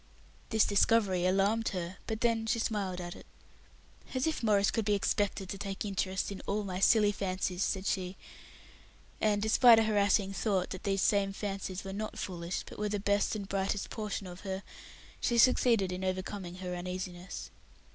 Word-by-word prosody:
This 220 -1 +4
discovery 200 -3 +3
alarmed 200 +4 +2
her, 175 +1 -5
but 220 0 -3
then 230 -2 +1
she 225 - +2
smiled 200 -5 -1
at 175 -1 -6
it. - - -13 0.9
"As 255 - +1
if 320 - -1
Maurice 205 -3 +3
could 225 - 0
be 205 0 +2
expected 200 -1 0
to 195 - -5
take 195 0 -4
interest 190 -1 -1
in 195 - -6
all 210 +1 0
my 185 -2 -4
silly 210 +1 +5
fancies," 185 -2 -2
said 190 -1 0
she; 190 -2 -2 1.0
and, 210 -1 +2
despite 230 +2 +7
a 225 - +5
harassing 205 -2 +2
thought 195 -3 0
that 185 - -7
these 195 -1 +1
same 200 -1 +2
fancies 195 -2 -4
were 195 0 -6
not 215 +2 -4
foolish, 175 -1 -4
but - - -10
were 210 0 0
the 205 0 -1
best 205 +2 +1
and 200 -2 -5
brightest 195 +1 -2
portion 210 -2 -4
of 180 0 -9
her, 190 0 -5 0.6
she 240 - +1
succeeded 230 -5 +4
in 180 +1 -4
overcoming 185 -1 -3
her 180 -1 -5
uneasiness. 180 0 -6
200 Hz, 175 wpm, -31 LUFS, 185-210 Hz, 1.0 s, despite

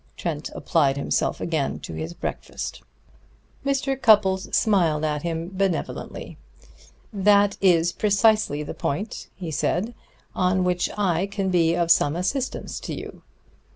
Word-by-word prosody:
Trent 160 -3 -3
applied 140 -4 +1
himself 140 - 0
again 160 -5 -1
to - - -7
his 80 +2 -5
breakfast. - - -5 0.8
Mr. 275 0 0
Cupples 195 -4 +4
smiled 170 -8 +2
at 150 -1 -1
him 165 +1 -3
benevolently. 190 -3 -3 0.7
"That 205 0 +4
is 175 -3 +4
precisely 205 -6 +2
the 150 - -6
point," 200 +10 -3
he 175 -4 -6
said, 180 +8 -1 0.4
"on 185 0 +1
which 180 -1 +1
I 190 -2 +1
can 195 -1 -2
be 170 -2 +3
of 170 -1 +2
some 145 -1 +4
assistance 250 +10 -2
to - - -5
you." - - -9
180 Hz, 130 wpm, -24 LUFS, 160-200 Hz, 0.8 s, Cupples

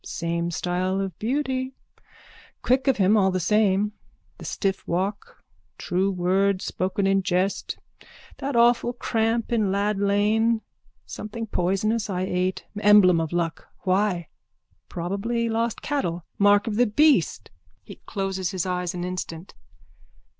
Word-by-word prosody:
Same 170 0 -2
style 180 +3 -1
of 195 -4 -4
beauty. 260 +1 -2 0.9
Quick 260 +3 +2
of 270 - +3
him 200 +1 +4
all 195 -3 +4
the 185 0 -1
same. 210 +1 +2 0.5
The - - -9
stiff 195 -2 -2
walk. 195 +4 -3 0.3
True 185 +2 0
word 190 +1 +1
spoken 190 +2 -1
in 195 0 +3
jest. 185 +1 -1 0.6
That 275 -1 -3
awful 240 +1 +4
cramp 230 -1 -1
in 215 -5 +1
Lad 200 +1 0
lane. 215 +3 +2 0.4
Something 225 +2 -6
poisonous 210 +3 0
I 185 -2 -2
ate. 185 0 -1
Emblem 205 -5 +6
of 160 - -3
luck. 170 -2 -2
Why? 185 -3 0 0.6
Probably 200 +7 -2
lost 225 0 -1
cattle. 175 - -2
Mark 205 +1 +5
of 215 -3 -2
the 245 0 +4
beast. 295 +8 +2 0.4
_(He - - -11
closes 195 -2 -2
his 185 -1 -2
eyes 180 -1 -2
an 175 - -4
instant.) 180 -1 -5
195 Hz, 130 wpm, -24 LUFS, 185-225 Hz, 0.9 s, Emblem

